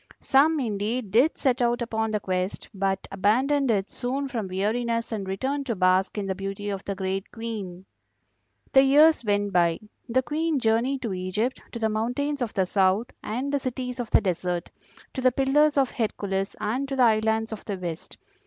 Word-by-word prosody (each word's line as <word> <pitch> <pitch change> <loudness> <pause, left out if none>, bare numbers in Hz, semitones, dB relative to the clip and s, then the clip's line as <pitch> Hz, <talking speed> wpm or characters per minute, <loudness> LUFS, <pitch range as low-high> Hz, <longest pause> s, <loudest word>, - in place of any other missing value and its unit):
Some, 300 +3 +3
indeed, 215 -1 -2
did 250 - +4
set 260 -2 +1
out 240 0 +2
upon 220 -2 -1
the 215 -1 0
quest, 185 -1 -3
but 195 -1 -1
abandoned 255 +8 +2
it 200 -3 +1
soon 265 +3 -2
from 230 -6 -3
weariness 230 +5 -1
and 205 -4 -3
returned 270 +9 -2
to 230 - -1
bask 185 +2 +2
in 205 - -2
the 195 - -1
beauty 195 +2 -4
of 195 -1 -5
the 200 - -3
great 190 0 -3
Queen. 205 -6 -6 0.9
"The 270 - +7
years 295 +2 +5
went 205 -2 0
by. 170 -2 +3 0.3
The 260 +3 +2
Queen 310 +4 0
journeyed 250 +3 +1
to 220 -5 -2
Egypt, 185 +7 -2
to - - -5
the 225 -1 +1
mountains 250 +7 -1
of 235 -4 -1
the 190 - +2
South, 195 +4 +1
and 255 +6 -3
the 285 - +2
cities 250 -1 -4
of 240 -3 -3
the - - +4
desert; 180 -2 -2 0.4
to 260 - -3
the 255 0 +4
Pillars 285 +4 +3
of 270 -2 +3
Hercules 195 -4 -2
and 230 +6 -1
to 270 - -2
the 260 - +4
islands 220 0 +2
of 220 - -6
the 200 -3 -3
West. 175 -3 -6
225 Hz, 190 wpm, -26 LUFS, 195-260 Hz, 0.9 s, The